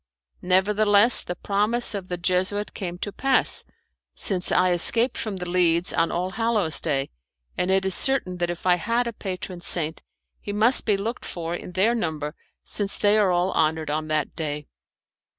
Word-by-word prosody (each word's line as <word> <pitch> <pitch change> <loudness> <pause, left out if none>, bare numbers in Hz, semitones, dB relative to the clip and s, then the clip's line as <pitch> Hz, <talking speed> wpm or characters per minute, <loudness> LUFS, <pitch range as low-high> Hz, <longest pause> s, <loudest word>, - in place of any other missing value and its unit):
Nevertheless 205 +4 +4
the 180 - -5
promise 210 +7 0
of 195 -3 -5
the 180 - -4
Jesuit 185 +4 -1
came 175 -2 -5
to 205 - -5
pass, 270 +5 +2 0.5
since 185 -3 -1
I 185 - +3
escaped 230 +8 +5
from 215 -3 -4
The 180 -1 -6
Leads 175 -1 +2
on 165 - +1
All 180 +2 -2
Hallows 215 -7 +1
Day; 140 -4 -2 0.4
and 180 - -1
it 190 0 +2
is 190 - 0
certain 260 -9 0
that 175 -1 -1
if 175 +1 -6
I 180 -1 +4
had 230 +6 -1
a 235 - -4
patron 185 -3 -6
saint, 160 -2 -1 0.4
he 205 - -6
must 225 +5 +2
be 205 -2 +3
looked 225 +5 -4
for 170 -1 -5
in 175 +1 -7
their 200 +6 +2
number 155 -9 -3 0.3
since 205 -1 -3
they 205 0 +3
are 210 -3 +3
all 180 +1 +1
honoured 155 -2 0
on 155 +1 -2
that 155 0 -2
day. 150 -2 -4
185 Hz, 180 wpm, -24 LUFS, 175-210 Hz, 0.5 s, escaped